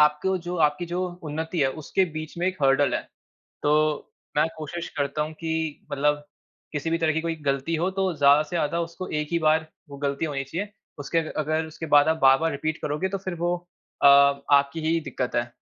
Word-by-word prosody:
आपको 150 +6 +3
जो 175 +1 -5
आपकी 150 +4 -3
जो 175 +2 -2 0.2
उन्नति 160 +2 -3
है 135 - +4
उसके 190 +6 +1
बीच 155 +1 -6
में 175 - 0
एक 185 0 -1
हर्डल 135 +1 +4
है। - - -1 0.6
तो, 150 0 +1 0.3
मैं 150 +1 +4
कोशिश 160 +2 -5
करता 145 +1 0
हूँ 155 +1 -4
कि 160 -2 -3
मतलब 150 +1 +1 0.5
किसी 150 +1 -2
भी 165 - +1
तरह 160 -2 +2
की 160 - 0
कोई 165 0 -2
गलती 140 +4 0
हो 175 +4 0
तो 190 -1 0
ज़्यादा 145 0 +5
से 155 +3 -5
ज़्यादा 170 +1 0
उसको 170 +2 -5
1 150 -1 -2
ही 170 - +3
बार 160 0 +2 0.2
वो 140 - -8
गलती 140 +1 -1
होनी 145 -3 -2
चाहिए 185 +9 -5 0.3
उसके 145 +4 -1
अ 160 -1 -2
अगर 155 +1 0
उसके 160 +1 -7
बाद 145 +1 +7
आप 160 - +3
बार-बार 135 +5 +5
रिपीट 155 +2 -2
करोगे 150 +6 -1
तो 195 +1 -3
फिर 185 -1 -5
वो 175 +1 0 0.5
अ, - - +7
आपकी 140 +1 +5
ही 165 +1 +2
दिक्कत 125 -5 -4
है। 120 0 -1
155 Hz, 210 wpm, -25 LUFS, 145-165 Hz, 0.6 s, बाद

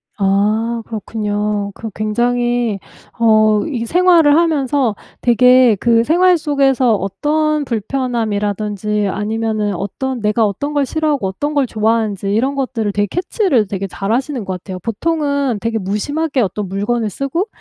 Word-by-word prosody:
아 215 +4 +1
그렇군요. 210 -1 -3
그 225 - -6
굉장히 240 0 0 0.4
어 215 -2 +4
이 245 -7 -3
생활을 340 0 +4
하면서 280 -8 +1 0.3
되게 250 -1 +5
그 230 -1 +3
생활 355 +6 +4
속에서 270 -6 +2
어떤 295 +10 -1
불편함이라든지 210 -4 -2
아니면은 215 +1 -2
어떤 250 +7 -4
내가 215 +1 +2
어떤 250 +9 -3
걸 285 -1 +1
싫어하고 295 -7 -1
어떤 290 +11 -3
걸 285 -2 +2
좋아하는지 215 -3 0
이런 260 +6 0
것들을 250 -6 -2
되게 205 0 0
캐치를 360 - 0
되게 195 0 -4
잘 195 +2 -4
하시는 255 0 -1
것 190 - -3
같아요. 185 0 -7
보통은 280 - -1
되게 230 +1 -2
무심하게 260 +9 -1
어떤 205 -1 -2
물건을 210 +4 -1
쓰고 275 - -2
230 Hz, 315 characters per minute, -17 LUFS, 210-275 Hz, 0.4 s, 되게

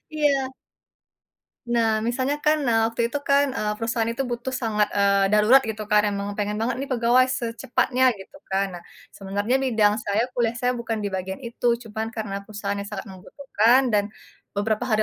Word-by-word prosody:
Iya. 275 -3 +1 1.2
Nah, 230 -2 +3
misalnya 260 +4 0
kan, 305 0 +4
nah, 230 -2 +3 0.2
waktu 230 - -5
itu 265 - -4
kan, 280 0 +5
eee, 210 0 -1
perusahaan 230 0 0
itu 260 - -2
butuh 240 +2 -4
sangat, 210 -2 +1
eee, 200 0 +2
darurat, 215 +6 +6
gitu 215 0 -5
kan. 210 -1 +5
Emang 200 0 -4
pengen 210 0 -2
banget 235 +2 -1
nih, - - -2
pegawai 240 +1 +4
secepatnya, 245 +2 0 0.2
gitu 195 +9 -13 0.2
kan. 195 +1 +2
Nah, 175 - -11 0.3
sebenarnya 205 +5 -1
bidang 215 -5 +3
saya, 205 +2 +1
kuliah 230 -2 +1
saya, 250 0 +2
bukan 225 -2 -3
di 205 - -2
bagian 190 +1 -4
itu. 240 -1 -5 0.2
Cuman 220 +1 -3
karena 215 -3 -5
perusahaan 200 -1 -4
yang 200 0 -5
sangat 200 +1 -5
membutuhkan 230 +5 +1
dan 210 -3 +2 0.5
beberapa 215 +3 0
hari 215 -3 +2
225 Hz, 175 wpm, -24 LUFS, 205-245 Hz, 1.2 s, darurat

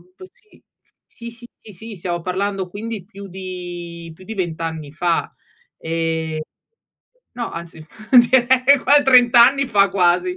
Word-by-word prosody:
avuto, 370 +1 -17
sì. 435 -4 -24 0.5
Sì, 235 0 -11
sì, 240 +1 -14
sì, 215 - -15
sì 220 +4 -10
stiamo 175 0 -4
parlando 190 +1 -3
quindi 210 +1 -7
più 200 -1 -11
di 175 -2 -8
più 185 - -16
di 220 - -7
20 170 -4 -4
anni 160 -3 -6
fa, 170 +1 -1 0.5
ehm, 160 -1 -3 0.9
no, 235 -1 -5
anzi 165 -2 -9 0.5
direi 260 +2 +4
qua 285 +2 +4
30 245 -3 +6
anni 275 +1 0
fa 200 -3 +3
quasi. 180 -1 +1
190 Hz, 145 wpm, -19 LUFS, 170-235 Hz, 0.9 s, 30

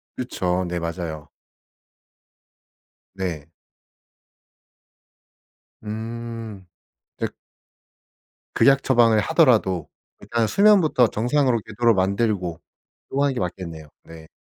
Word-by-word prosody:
그쵸. 90 -7 -2
네 85 0 -3
맞아요. 85 -2 -5 1.9
네. 85 -7 -5 2.3
음 110 -2 -6 0.5
댁 - - -4 1.2
극약 135 0 +4
처방을 115 -4 +4
하더라도 95 - +2 0.3
일단 115 -2 -1
수면부터 190 - +4
정상으로 125 +1 +1
되도록 115 +1 +2
만들고 95 -3 0 0.5
그러고 140 +1 -1
하는 140 -2 +1
게 - - -4
맞겠네요. 85 -4 -5 0.2
네. 80 -1 -13
105 Hz, 185 characters per minute, -23 LUFS, 90-120 Hz, 2.3 s, 극약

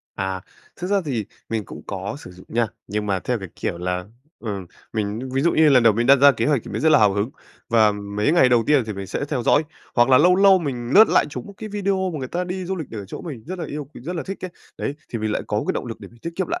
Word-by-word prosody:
À, 95 -1 -2 0.4
thực 175 - -4
ra 200 +1 +2
thì 125 -8 -2 0.2
mình 110 -2 -2
cũng - - -10
có 100 +5 -4
sử 120 - -11
dụng 90 +1 -15
nha, 115 0 +1 0.2
nhưng 105 +1 -3
mà 100 -2 +1
theo 125 +5 -1
cái 95 -3 -7
kiểu 85 - -3
là, 90 +1 -2 0.3
ừ, 105 -4 -4 0.3
mình 110 +3 -2
ví 135 - +2
dụ 170 - +3
như 160 -1 +5
lần 130 -4 +6
đầu 115 -1 +6
mình 115 +3 0
đặt 140 +2 +8
ra 140 +1 +7
kế 115 -2 -1
hoạch 145 -4 +2
thì - - -9
mình - - -3
rất 160 - +4
là 150 - +7
hào 105 -2 +5
hứng, 100 +5 -1 0.4
và 110 -2 +4
mấy 105 +6 -1
ngày 165 -7 +5
đầu 120 -2 +4
tiên 145 -3 +4
thì 110 - -3
mình 100 -1 -6
sẽ 105 - -3
theo 135 -5 -1
dõi. 145 - +4 0.3
Hoặc 120 0 +4
là 130 -1 +7
lâu 180 +5 +5
lâu 195 -1 +6
mình 125 -7 -4
lướt 215 +2 +9
lại - - +4
trúng 125 -3 -6
một - - -10
cái 220 - -7
video 195 -2 -1
mà 155 - -4
người 130 -2 -5
ta 180 +5 -2
đi 180 +1 -4
du 190 +2 -3
lịch 160 -6 -6
ở 105 -3 -6
chỗ 95 - -8
mình 140 -10 -7
rất 185 +3 -5
là - - -3
yêu 150 0 -5
quý, 140 0 -14
rất 170 +8 -5
là 165 - -2
thích 195 -1 -6
ấy, 185 - -4 0.3
đấy, 140 - -2
thì 115 - -4
mình 110 0 -1
lại - - -1
có - - -2
một - - -2
cái - - +3
động - - -4
lực - - -7
để - - -10
mình 120 - -20
tiết 170 - -4
kiệm 190 - 0
lại, 345 +1 -2
125 Hz, 310 wpm, -22 LUFS, 105-170 Hz, 0.4 s, lướt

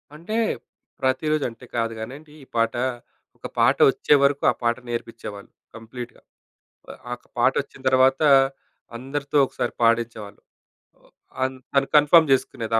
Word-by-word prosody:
అంటే 170 +8 -6 0.7
ప్రతిరోజు 145 +3 0
అంటే 115 +2 -14
కాదు 115 -1 -1
కానండి 145 +7 -9
ఈ - - -15
పాట. 115 0 +1 0.6
ఒక - - -7
పాట - - +4
వచ్చేవరకు 140 -1 +2
ఆ - - -4
పాట 120 +1 +1
నేర్పిచ్ఛేవాళ్ళు 115 -3 -7 0.2
కంప్లీట్‌గా. 115 +2 -9 0.9
ఆ 120 - -6
ఒక - - -31
పాట 120 +2 +4
వచ్చిన 135 - -16
తర్వాత 130 +2 +3 0.8
అందరితో 140 +3 -3
ఒకసారి 125 -2 -4
పాడిచ్ఛేవాళ్ళు. 115 -3 0 1.0
ఆ - - +1
తన్ 130 0 -5 0.2
తను 140 -1 +2
కన్ఫర్మ్ 150 +1 +6
చేసుకునేది 115 -3 0
130 Hz, 125 wpm, -23 LUFS, 115-140 Hz, 1.0 s, కన్ఫర్మ్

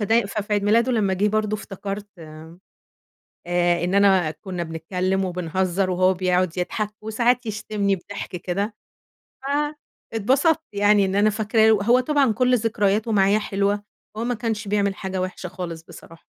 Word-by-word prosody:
فده 225 +1 +2
ففي 210 +1 -4
عيد 205 -1 +2
ميلاده 230 +4 +3
لمّا 200 -5 +1
جه 205 +3 +1
برضو 215 0 0
افتكرت 200 0 -6 1.2
آآ، 175 0 -1
إن 180 +2 -1
أنا 190 -5 +4
كنا 180 +2 -6
بنتكلم 180 +4 -2
وبنهزر 185 +1 -1
وهو 185 +1 +3
بيقعد 180 -1 0
يضحك 210 +3 -2
وساعات 235 +3 +1
يشتمني 205 -2 -1
بضحك 200 +3 -7
كده، 200 +5 -3 1.4
فاتبسطت 270 - +2
يعني 205 0 +4
إن 190 +1 -2
أنا 210 +1 +4
فاكراه 220 +1 +2
له 205 -2 +3
هو 245 +3 +4
طبعًا 275 -2 +2
كُلّ 250 +2 +3
ذكرياته 215 -1 0
معايا 200 +1 +3
حلوة، 205 0 -1 0.3
هو 225 - -2
ما 245 +1 0
كانش 220 -2 -3
بيعمل 200 -1 +1
حاجة 190 -1 -4
وحشة 185 0 -5
خالص 170 -3 -6
بصراحة. 165 0 -14
200 Hz, 150 wpm, -23 LUFS, 185-215 Hz, 1.4 s, أنا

